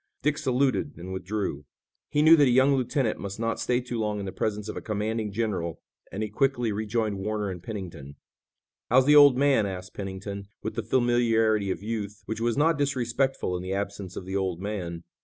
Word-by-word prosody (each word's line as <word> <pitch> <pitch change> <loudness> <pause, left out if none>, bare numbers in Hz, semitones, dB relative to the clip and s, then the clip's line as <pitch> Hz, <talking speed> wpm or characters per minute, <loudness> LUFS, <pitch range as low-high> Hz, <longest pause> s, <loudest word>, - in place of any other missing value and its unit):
Dick 150 0 +1
saluted 135 +3 0
and 90 +2 -7
withdrew. 95 -5 -3 0.5
He 150 0 +2
knew 160 +1 +9
that 145 -2 +5
a - - +3
young 130 +3 +5
lieutenant 130 -2 0
must 100 +1 -6
not 115 0 -1
stay 125 0 +1
too 120 -1 -4
long 105 -1 -1
in 100 - -4
the 95 - -4
presence 105 0 -2
of 110 - -5
a - - -5
commanding 110 0 -2
general 100 -7 -2 0.3
and 105 +3 -3
he 105 - -3
quickly 120 -1 +1
rejoined 105 -1 -1
Warner 105 0 -2
and 90 -2 -7
Pennington. 90 -9 -7 0.7
"How's 130 +2 +5
the 150 +1 +6
old 145 -3 +8
man?" 135 -6 +3
asked 95 -1 -7
Pennington, 100 0 -6 0.2
with 110 - -3
the - - -2
familiarity 115 -4 +2
of 95 - -3
youth, 105 -2 -4
which 110 0 -4
was 120 -1 +1
not 155 +1 +3
disrespectful 130 -6 0
in 90 - -3
the 95 +1 -3
absence 100 -2 -4
of 90 - -6
the 95 +1 -4
"old 95 -3 -1
man." 90 -4 -4
110 Hz, 200 wpm, -27 LUFS, 95-125 Hz, 0.7 s, knew